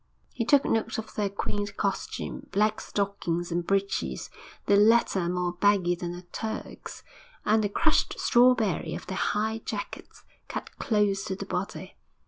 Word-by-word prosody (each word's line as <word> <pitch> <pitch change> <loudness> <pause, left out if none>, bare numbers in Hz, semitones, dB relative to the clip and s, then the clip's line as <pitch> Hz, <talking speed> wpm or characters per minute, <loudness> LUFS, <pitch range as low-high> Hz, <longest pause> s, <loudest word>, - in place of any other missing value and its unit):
He 230 - -2
took 285 +3 +5
note 225 0 0
of 220 -1 -6
their 205 -2 0
quaint 205 +1 -3
costume 200 -2 -3
black 210 +2 +2
stockings 180 -4 -2
and 175 +1 0
breeches, 195 0 -1 0.3
the 205 - +4
latter 205 -4 +4
more 180 0 -1
baggy 185 -1 +3
than 175 0 -4
a 175 - -9
Turk's, 220 0 -6 0.4
and 215 +1 +3
the 205 - +1
crushed - - +2
strawberry 240 -9 +3
of - - -7
their 185 - -4
high 220 +3 0
jackets, 205 -2 -6 0.2
cut - - -6
close 205 -5 +1
to 190 - -2
the 200 - -6
body. 195 +2 -4
200 Hz, 150 wpm, -28 LUFS, 185-220 Hz, 0.4 s, took